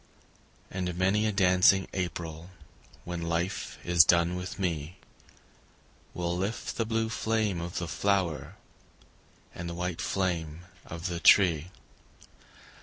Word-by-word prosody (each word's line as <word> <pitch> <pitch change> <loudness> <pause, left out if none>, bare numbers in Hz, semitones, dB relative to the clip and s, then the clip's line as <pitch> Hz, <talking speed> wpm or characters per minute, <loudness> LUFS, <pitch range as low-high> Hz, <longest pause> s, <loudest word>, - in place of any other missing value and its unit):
And 90 -2 -3
many 100 +4 +2
a - - +1
dancing 95 -1 +4
April 85 -2 -4 0.5
When 85 -1 -5
life 85 +2 -2
is 85 -1 +6
done 85 +1 +3
with 90 +1 -5
me, 85 -3 -3 1.2
Will 85 0 -1
lift 100 +6 -3
the 115 - 0
blue 110 0 0
flame 105 -2 -1
of 85 +1 -5
the 85 - -2
flower 95 -4 -1 1.0
And 85 0 -6
the 85 - -5
white 90 -1 -3
flame 85 -4 -2 0.3
of 85 0 -7
the 85 -2 -2
tree. 85 -3 +5
90 Hz, 120 wpm, -29 LUFS, 85-95 Hz, 1.2 s, is